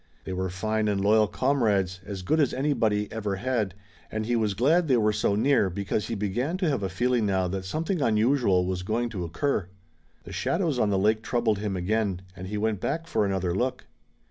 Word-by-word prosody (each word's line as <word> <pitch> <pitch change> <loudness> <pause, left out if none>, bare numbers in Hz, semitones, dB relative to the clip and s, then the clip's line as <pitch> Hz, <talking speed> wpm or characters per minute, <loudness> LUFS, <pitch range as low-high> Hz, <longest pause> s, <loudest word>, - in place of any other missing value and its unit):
They 95 - -5
were 95 0 -2
fine 110 +4 -1
and 100 -1 +1
loyal 105 +2 +4
comrades, 100 -7 +1
as 95 0 -6
good 155 - +1
as 145 -5 +2
anybody 115 -7 +1
ever 105 -3 -2
had, 105 -3 -1 0.4
and 110 0 -2
he 120 +2 0
was 110 -3 0
glad 160 - +3
they 130 -3 +4
were 105 -1 +2
so 105 -1 +1
near, 115 -2 +3
because 100 +3 -2
he 115 - -3
began 120 - -1
to 185 -2 0
have 135 -7 0
a 95 - -2
feeling 120 +3 +1
now 95 -2 +1
that 95 0 -4
something 160 - -2
unusual 110 -5 +3
was 90 0 -2
going 115 +5 -1
to 100 -6 -4
occur. 90 - -1 0.6
The - - -10
shadows 165 -7 0
on 105 - +2
the 100 - +2
lake 110 +3 +2
troubled 115 -3 0
him 100 -2 -2
again, 95 0 -1
and 95 0 -7
he 105 +2 -3
went 105 -1 0
back 165 - -2
for 105 -11 0
another 95 -3 -1
look. 125 +7 -2
105 Hz, 210 wpm, -26 LUFS, 95-125 Hz, 0.6 s, loyal